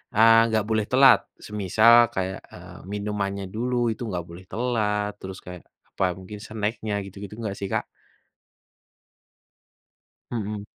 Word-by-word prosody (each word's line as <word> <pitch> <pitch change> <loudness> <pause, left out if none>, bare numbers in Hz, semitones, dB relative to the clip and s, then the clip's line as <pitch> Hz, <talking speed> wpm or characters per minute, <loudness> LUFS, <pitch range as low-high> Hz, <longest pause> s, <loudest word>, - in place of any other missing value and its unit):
eee, 115 +1 +7
nggak 110 -1 +1
boleh 110 -1 +1
telat, 130 0 +7 0.3
semisal 110 +4 +5
kayak, 95 0 -2
eee, - - -11
minumannya 100 -1 -3
dulu 125 +3 -1 0.2
itu 110 - -7
nggak 90 -5 -4
boleh 85 +2 -11
telat, 105 -4 0
terus 95 0 -8
kayak 90 -1 -10 0.3
apa, - - -1 0.2
mungkin 100 +3 -9
snack-nya 110 0 -3
gitu-gitu 100 +1 -9
nggak 105 -4 -4
sih 100 - -3
Kak? - - 0 2.5
Mhm. 105 -3 -4
105 Hz, 130 wpm, -25 LUFS, 100-110 Hz, 2.5 s, eee